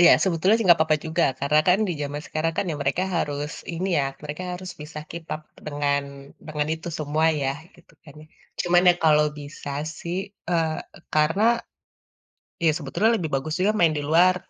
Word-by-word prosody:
Iya, 175 - +9
sebetulnya 185 +3 +3
sih, 225 - -1
enggak 175 - +7
apa-apa 155 -1 +3
juga. 165 +2 +1 0.2
Karena 150 +2 +4
kan 180 +3 +5
di - - 0
zaman 145 +1 -4
sekarang 160 +1 -1
kan - - +1
ya, 150 - -3
mereka 140 +6 0
harus 145 -2 -2 0.2
ini 180 +3 -2
ya, 140 - +2 0.2
mereka 150 +5 -5
harus 185 0 -7
bisa 150 +1 -8
keep 170 -1 -7
up 155 - -8 0.2
dengan 145 -1 0 0.5
dengan 150 -1 -2
itu 165 +2 -8
semua 155 +1 +1 0.2
ya, 135 - +1 0.2
gitu 175 - -21
kan, 145 - -14
ya. - - -15 0.3
Cuman 175 0 +4
ya, - - +3
kalau 150 -1 +5
bisa 145 0 -8 0.3
sih, 170 +1 -4 0.3
eee, 165 -2 +1 0.4
karena 155 +7 +2 1.2
iya, 165 - +4
sebetulnya 175 - +1
lebih 165 -7 -2
bagus 145 +4 -2
juga 195 +3 +3
main 165 -2 +4
di - - -1
luar. 180 +3 +5
160 Hz, 185 wpm, -24 LUFS, 150-175 Hz, 1.2 s, Iya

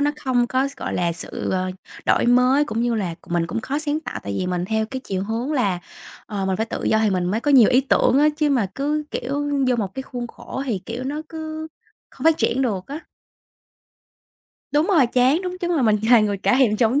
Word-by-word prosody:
nó 290 +1 +2
không 245 -2 +2
có 260 +2 0
s 275 - -14
gọi - - -4
là, 170 -1 0
sự, 170 - -5
ờ, 185 0 -1 0.4
đổi - - +3
mới 250 +4 +4
cũng 230 -5 -2
như 240 -1 +1
là 185 -6 -2
c - - -23
mình 170 -1 0
cũng 230 +5 -3
khó 275 +6 -2
sáng 305 0 -1
tạo. - - -6
Tại 100 - -5
vì 180 - -1
mình 180 -1 -1
theo 220 +2 -1
cái 260 +3 -6
chiều 190 -1 -2
hướng 230 +7 -2
là, 200 -11 +1 0.5
ờ, 195 -2 -3
mình 190 -1 0
phải 220 - -1
tự 230 - -5
do 220 - +3
thì 220 -2 +2
mình 180 -2 0
mới 205 +5 0
có 290 - 0
nhiều 255 -6 +7
ý 255 +1 +5
tưởng 270 0 +3
á, 300 +1 +5
chứ 305 -1 +1
mà 250 -7 +2
cứ, 300 +2 -1
kiểu, 290 +3 -2 0.2
vô 250 - +2
một 200 -4 -3
cái 265 - -4
khuôn 245 -2 -6
khổ 260 +3 -7
thì, 220 -6 -1
kiểu, 235 +3 -5
nó 295 +3 -3
cứ 315 0 -6 0.4
không - - -10
phát 325 -1 +5
triển 235 +3 +1
được 200 -7 -2
á. 285 +4 -6 1.7
Đúng 300 +3 +3
rồi, 330 -11 +4
chán. 255 +6 +3
Đúng, 365 0 -4
chắc 350 -1 -2
là 325 -6 +2
mình 215 -3 +4
là 240 -2 +8
người 205 -1 0
cả 245 - +2
thèm 225 -5 +3
chóng 240 +5 +2
245 Hz, 245 wpm, -22 LUFS, 215-285 Hz, 1.7 s, là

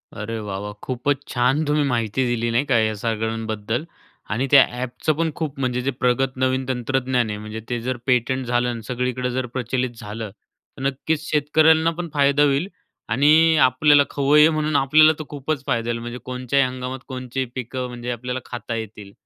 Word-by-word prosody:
अरे 110 +2 -4
वाह! 100 -2 -5
वाह! 105 0 -6
खूपच 135 +2 -1
छान 125 +5 +2
तुम्ही 150 0 +2
माहिती 120 0 0
दिली, 120 -1 0
नाही 125 +5 +1
का, 135 -4 +2
या 110 0 +1
सगळ्यांबद्दल. 110 +2 -2 0.5
आणि 120 +5 -1
त्या 140 -1 +9 0.2
ॲपचं 130 +5 -1
पण 165 +1 -1
खूप 150 -4 -4
म्हणजे 125 -1 -1
जे 135 +2 -1
प्रगत 130 +1 +1
नवीन 130 0 +1
तंत्रज्ञान 125 -1 0
आहे, 105 - -3
म्हणजे 105 +1 -7
ते 120 -1 -1
जर 130 -1 -1
पेटंट 130 0 +1
झालं 120 0 +1
आणि 120 -1 -4
सगळीकडं 125 0 -2
जर 130 +1 -2
प्रचलित 125 +1 -1
झालं, 105 0 -6 0.5
तर - - -8
नक्कीच 150 +3 -2
शेतकऱ्यांना 160 +2 +4
पण 175 -1 -4
फायदा 140 0 +3
होईल. 145 +4 +2 0.4
आणि 155 +7 +5
आपल्याला 145 +3 +4
खवय्ये 150 +2 +5
म्हणून 155 -1 -1
आपल्याला 155 +3 +5
तर - - -3
खूपच 145 0 -3
फायदा 115 0 -1
येईल. 115 0 -1
म्हणजे 120 +1 -6
कोणत्याही 130 +2 +1
हंगामात 130 +1 -5
कोणते 130 -1 -5
ही 130 - +1
पिकं 130 0 -4
म्हणजे 120 0 -5
आपल्याला 125 +2 -4
खाता 120 -1 -5
येतील. 105 -3 -7
130 Hz, 180 wpm, -22 LUFS, 120-140 Hz, 0.5 s, त्या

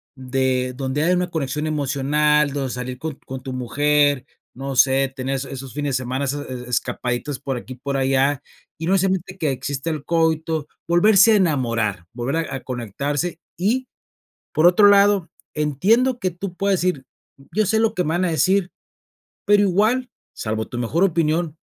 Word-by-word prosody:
de 130 -1 -1
donde 135 +2 -2
haya 180 +3 +3
una 180 0 -1
conexión 150 -1 -2
emocional, 150 0 +1
donde 140 -2 -2
salir 125 0 -5
con 155 -2 -4
con 130 0 -6
tu 130 -1 -5
mujer, 145 +2 +1 0.3
no 135 +1 -5
sé, 135 +1 +4
tener 135 0 -2
es 135 0 -3
esos 135 -1 -8
fines 145 -2 -2
de 130 - -4
semana 130 +3 -2
esas 145 +1 -4
e 125 -1 -7
escapaditas 125 +3 -2
por 135 -1 -3
aquí, 130 +2 -8
por 140 +2 -3
allá, 135 +1 +2 0.4
y 160 - -3
no 190 - +3
necesariamente 190 -1 0
que 155 -5 0
exista 135 +3 -3
el 155 -3 -3
coito, 160 -2 0 0.2
volverse 205 +5 +6
a - - +5
enamorar, 115 - 0
volver 125 +6 -2
a 140 - -4
a - - -4
conectarse 140 - -3 0.2
Y 240 +8 0 0.7
por 155 - +4
otro 190 +4 +7
lado, 200 -3 +4 0.3
entiendo 210 - +2
que 185 - 0
tú 180 +1 -7
puedes 195 -1 +1
decir: 175 -7 -1 0.5
"Yo 215 0 +1
sé 220 +3 +2
lo 225 -1 +2
que 180 - 0
me 155 - -1
van 175 +3 +1
a - - 0
decir", 185 +3 +2 0.8
pero 205 -1 +5
igual, 215 +7 +2 0.3
salvo 110 0 -3
tu 120 - -7
mejor 145 +10 0
opinión, 165 -2 0
145 Hz, 175 wpm, -21 LUFS, 130-180 Hz, 0.8 s, otro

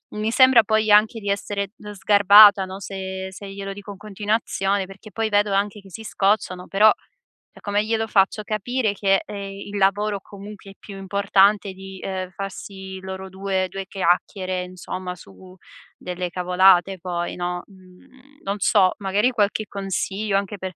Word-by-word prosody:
mi 215 +1 -1
sembra 260 -3 +6
poi 220 -1 +1
anche 215 +2 +4
di 200 -1 -5
essere 200 0 -2 0.3
sgarbata, 200 0 +7
no, 190 +1 -8
se 190 -1 -6
se 195 +1 -10
glielo 195 0 -6
dico 205 +1 -10
in 195 - -10
continuazione, 205 -1 -1
perché 200 +2 -13
poi 220 +2 -2
vedo 205 -1 +2
anche 205 +1 -1
che 195 -1 -17
si 220 - -8
scocciano, 195 -3 0
però 210 +2 +5 0.7
come 205 +1 -1
glielo 225 0 -1
faccio 210 +1 +1
capire 215 +2 -1
che, 195 -1 +1
ehm, - - -8
il 200 +1 -6
lavoro, 200 +1 +1
comunque, 200 0 -12
è - - -14
più 200 -2 -11
importante 200 +1 +2
di, 190 0 -11
uhm, 185 -1 -4
farsi 190 0 -8
loro 190 0 -7
due 190 0 -2
due 195 +1 -6
chiacchiere, 185 0 -1
insomma, 180 0 -7
su 180 - -15 0.4
delle 180 0 -5
cavolate 180 +1 +3
poi, 175 -1 -3
no, 175 0 -4
mhmm, 250 +9 -20
non 200 +1 -3
so 190 -1 +4
magari 205 +5 +1
qualche 215 -2 0
consiglio 195 +1 -2
anche 200 +1 -4
per 190 -1 -6
195 Hz, 160 wpm, -22 LUFS, 190-210 Hz, 0.7 s, sgarbata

